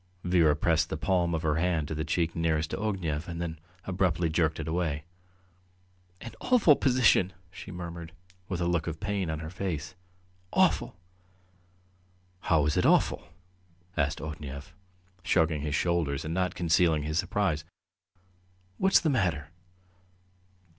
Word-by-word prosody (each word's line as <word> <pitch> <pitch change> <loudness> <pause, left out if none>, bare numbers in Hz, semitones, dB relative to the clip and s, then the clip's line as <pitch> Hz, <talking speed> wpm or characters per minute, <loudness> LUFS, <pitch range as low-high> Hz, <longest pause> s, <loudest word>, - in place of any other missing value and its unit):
Vera 85 -4 +4
pressed 80 +1 +1
the 80 - -3
palm 85 0 +1
of 80 - -3
her 75 -1 +1
hand 80 -3 0
to - - -4
the 80 0 -2
cheek 85 0 -1
nearest 80 -1 0
to - - -2
Ognev, 90 -7 -2
and 85 -1 -5
then 80 -2 -4 0.3
abruptly 90 -2 +1
jerked 80 -1 +1
it 80 - -4
away. 80 -3 -1 1.2
"An 115 - -8
awful 220 - +5
position!" 125 -9 +3 0.2
she 95 - -10
murmured, 85 -2 -7 0.4
with 95 -3 -2
a - - +1
look 85 -2 0
of 80 -1 -4
pain 100 -3 -2
on 80 0 -3
her 80 0 -6
face. 85 -4 -4 0.6
"Awful!" - - +2 1.4
"How 80 -5 +2
is 75 - 0
it - - +3
awful?" - - +2 0.7
asked 75 0 0
Ognev, 75 +1 -7 0.5
shrugging 80 -3 +2
his 75 -1 -2
shoulders 80 -6 0
and 80 - -3
not 90 +1 0
concealing 85 -2 +2
his 75 +2 -1
surprise. 95 -5 0 1.2
"What's 190 0 +5
the 160 - +1
matter?" 90 - 0
85 Hz, 145 wpm, -28 LUFS, 80-90 Hz, 1.4 s, awful